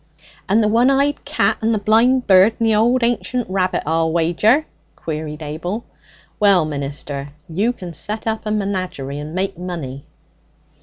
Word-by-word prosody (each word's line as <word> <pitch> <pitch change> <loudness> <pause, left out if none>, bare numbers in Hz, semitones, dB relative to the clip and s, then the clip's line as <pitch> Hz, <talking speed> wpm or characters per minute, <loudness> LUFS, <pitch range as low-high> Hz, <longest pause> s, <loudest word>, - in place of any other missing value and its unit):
'And 215 +3 +4
the - - +3
one 235 +4 +4
eyed 280 +1 +1
cat - - +1
and 225 +1 +2
the - - +1
blind 230 +5 +3
bird 195 +3 +5
and 230 - +2
the 220 - +3
old 235 +4 +3
ancient 240 +1 0
rabbit, 185 -1 0
I'll 160 +1 +1
wager!' 175 - +2 0.3
queried 155 -1 -5
Abel. 175 +9 -4 0.5
'Well, 200 -6 +4
minister, 140 -1 -5 0.2
you 195 +8 0
can 180 -8 -8
set 215 +7 -5
up 220 -1 -2
a - - -1
menagerie 185 -9 -3
and 150 +3 -7
make 190 -1 -2
money.' 155 -7 -6
195 Hz, 160 wpm, -19 LUFS, 160-225 Hz, 0.5 s, bird